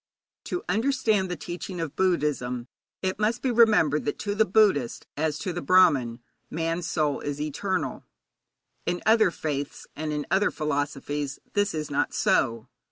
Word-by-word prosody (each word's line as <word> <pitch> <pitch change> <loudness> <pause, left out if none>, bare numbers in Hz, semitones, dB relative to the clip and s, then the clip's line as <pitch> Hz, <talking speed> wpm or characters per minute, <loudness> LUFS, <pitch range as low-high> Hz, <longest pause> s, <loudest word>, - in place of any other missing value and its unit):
_ - - -68
To 360 - -3
understand 220 -5 +1
the 180 - -2
teaching 175 +3 -6
of 160 -3 -4
Buddhism, 140 -9 0 0.4
it 190 +1 -1
must 220 +3 0
be 260 - +2
remembered 215 -11 +4
that 145 - -1
to 205 - -1
the 220 +1 +3
Buddhist, 190 - +2
as 150 0 -1
to 185 +1 -3
the 175 - -3
Brahmin, 140 -11 +4 0.3
man's 165 +1 -2
soul 150 -3 0
is 145 0 -4
eternal. 185 +6 -2 0.8
In 175 - -1
other 220 -3 +5
faiths 145 -4 -4
and 150 -1 -3
other 195 +2 +3
philosophies 145 -1 -2 0.2
this 205 -3 +1
is 150 -1 -4
not 140 - 0
so. 115 +1 +1
165 Hz, 155 wpm, -26 LUFS, 145-200 Hz, 0.8 s, other